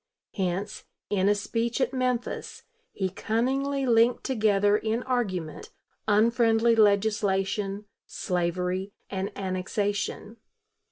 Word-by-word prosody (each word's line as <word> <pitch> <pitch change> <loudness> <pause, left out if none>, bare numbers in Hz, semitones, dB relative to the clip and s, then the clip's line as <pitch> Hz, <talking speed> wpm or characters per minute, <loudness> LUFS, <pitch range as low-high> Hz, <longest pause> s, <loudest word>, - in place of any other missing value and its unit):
Hence, 190 +1 -3 0.3
in 200 -1 +2
a 205 - +4
speech 230 +4 -2
at 260 0 0
Memphis, 250 -2 -2 0.3
he 190 - -2
cunningly 265 +8 -1
linked 235 0 +3
together 210 -4 +2
in 220 +3 -1
argument 195 -11 -2 0.4
unfriendly 230 +2 +4
legislation, 205 -1 +1 0.2
slavery, 180 +2 -2 0.2
and 195 +1 -2
annexation. 200 +3 -2
210 Hz, 95 wpm, -27 LUFS, 195-235 Hz, 0.4 s, a